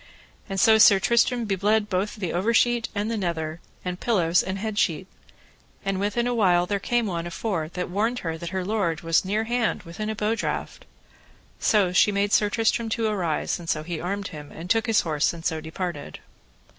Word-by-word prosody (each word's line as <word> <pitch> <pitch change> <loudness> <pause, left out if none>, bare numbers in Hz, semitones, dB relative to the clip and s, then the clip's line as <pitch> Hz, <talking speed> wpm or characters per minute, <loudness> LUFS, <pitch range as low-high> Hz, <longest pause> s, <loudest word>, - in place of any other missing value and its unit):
And 195 0 -2
so 220 +1 +6
Sir 200 -2 +7
Tristram 235 +2 +2
be 200 -2 0
bled 210 +2 +1
both 195 +1 -1
the 190 -6 -4
over 210 +7 +1
sheet 240 0 +2
and 205 +2 -1
the 230 - -1
nether, 165 -4 -3 0.2
and 180 0 -3
pillows, 180 -7 +2
and 190 +1 -4
head 210 +1 -3
sheet. 170 +3 0 0.8
And 195 -1 -1
within 205 +4 0
a 245 - 0
while 180 -6 +3
there 200 +2 -1
came 240 +3 0
one 170 -4 -3
afore, 170 -2 -3
that 180 -1 -2
warned 220 +7 0
her 165 -1 -2
that 170 +1 -6
her 190 0 -3
lord 190 -6 -1
was 165 -1 +2
near 205 +4 0
hand 235 -3 -1
within 185 +5 -5
a 220 - -2
bow 215 +1 0
draught. 230 - -4 0.7
So 200 -4 +3
she 205 - +5
made 200 +1 0
Sir 210 - +4
Tristram 225 +1 0
to 225 0 -1
arise, 185 -9 -1
and 170 -1 -8
so 155 - 0
he 165 -1 -5
armed 200 +3 -3
him, 150 -2 -10
and 170 +4 -6
took 225 +1 +2
his 225 -2 +4
horse, 155 -2 0
and 165 -1 -10
so 160 -1 -1
departed. 160 -1 -5
195 Hz, 205 wpm, -25 LUFS, 170-220 Hz, 0.8 s, Sir